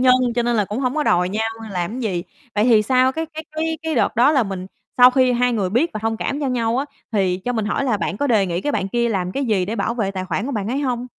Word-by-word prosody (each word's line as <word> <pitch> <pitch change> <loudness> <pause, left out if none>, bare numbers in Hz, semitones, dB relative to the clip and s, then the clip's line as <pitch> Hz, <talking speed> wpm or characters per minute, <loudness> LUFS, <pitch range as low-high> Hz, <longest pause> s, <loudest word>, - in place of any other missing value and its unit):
nhân 255 0 +6 0.2
cho 240 - +1
nên 240 0 +1
là 210 - +2
cũng 210 +5 -4
hông 255 +1 0
có 305 - +1
đòi 180 -8 +2
nhau 220 +3 -1 0.2
làm 190 +6 -3
gì. 190 -7 -1 0.3
Vậy 210 +1 +2
thì 225 -3 +5
sau 255 +3 +3
cái 320 +2 -3
cái 315 0 -8
cái 320 0 -2
cái 320 -1 -2
đợt 230 - +1
đó 255 +6 +5
là 270 -5 +3
mình 190 -3 -5 0.3
sau 250 0 +8
khi 255 -1 +3
hai 245 0 +2
người 195 -5 -1
biết 275 +10 +2
và - - -4
thông 225 0 0
cảm 280 +5 -3
cho 280 - -1
nhau 235 -2 0
á 280 - 0 0.3
thì 190 -4 +1
cho 245 - -1
mình 220 -3 -1
hỏi 245 +6 -1
là 235 -5 +1
bạn 200 - -3
có 285 - 0
đề 220 -7 +3
nghị 175 0 -2
cái 290 - -2
bạn 195 - -1
kia 235 +2 0
làm 185 -4 -2
cái 275 - -1
gì 210 -6 +1
để 215 +5 -4
bảo 235 - -1
vệ 210 -5 -1
tài 185 -1 -4
khoản 185 +4 -2
của 280 - -3
bạn 210 -2 -2
ấy 265 +4 -1
hông? 250 -3 -2
235 Hz, 305 wpm, -21 LUFS, 200-260 Hz, 0.3 s, sau